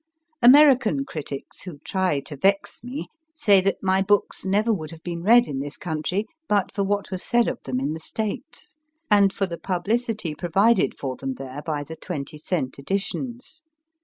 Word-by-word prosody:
American 275 +1 +6
critics 145 - -7
who 180 -5 -8
try 185 -6 +1
to 145 - -7
vex 195 +10 0
me 250 +4 -5 0.3
say 205 -11 +5
that 195 +1 -1
my 190 0 +3
books 205 +1 +1
never 210 +4 +2
would 155 -6 -4
have 165 0 -12
been 170 -1 -4
read 235 +6 +6
in 135 -2 -4
this 145 +2 -5
country 175 +5 -2 0.2
but 200 -2 +1
for 200 - 0
what 200 0 -1
was 185 -1 -3
said 240 -1 +2
of - - -3
them 130 -1 -1
in 140 +3 -1
the 160 - -6
States, 225 - -6 0.3
and 200 -1 +6
for 195 - -1
the 170 -3 -6
publicity 210 0 -1
provided 195 +8 +2
for 130 -2 -4
them 135 -1 -4
there 135 +2 -7
by 150 -2 -2
the 160 +3 -8
twenty 155 -3 -6
cent 150 -5 -2
editions. 235 - -4
190 Hz, 180 wpm, -24 LUFS, 155-215 Hz, 0.3 s, American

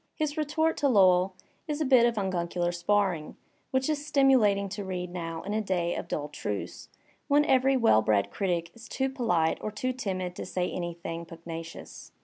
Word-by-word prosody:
His 300 -1 -2
retort 315 +1 0
to 290 - +2
Lowell 185 -5 +4 0.3
is 300 -1 -2
a 310 - +1
bit 255 -3 +6
of 235 - -1
unguicular 175 -3 -1
sparring, 175 -2 0 0.3
which 260 0 0
it - - +2
is 290 -1 -2
stimulating 260 -9 +3
to 200 +1 -5
read 180 -2 -4
now 165 -2 -5
in 205 - -4
a 220 - +1
day 180 -4 -1
of - - -5
dull 150 -3 -3
truce, 105 -8 -5 0.4
when 290 +1 +4
every 265 -1 +3
well 225 - +5
bred 105 -2 +1
critic 175 -4 -1
is 230 -1 -13
too 265 0 -1
polite 175 - +1
or - - -3
too 255 +5 -2
timid 185 -7 -3
to - - -4
say 180 -1 -2
anything 170 -1 -5
pugnacious. 165 0 -9
195 Hz, 185 wpm, -28 LUFS, 170-260 Hz, 0.4 s, bit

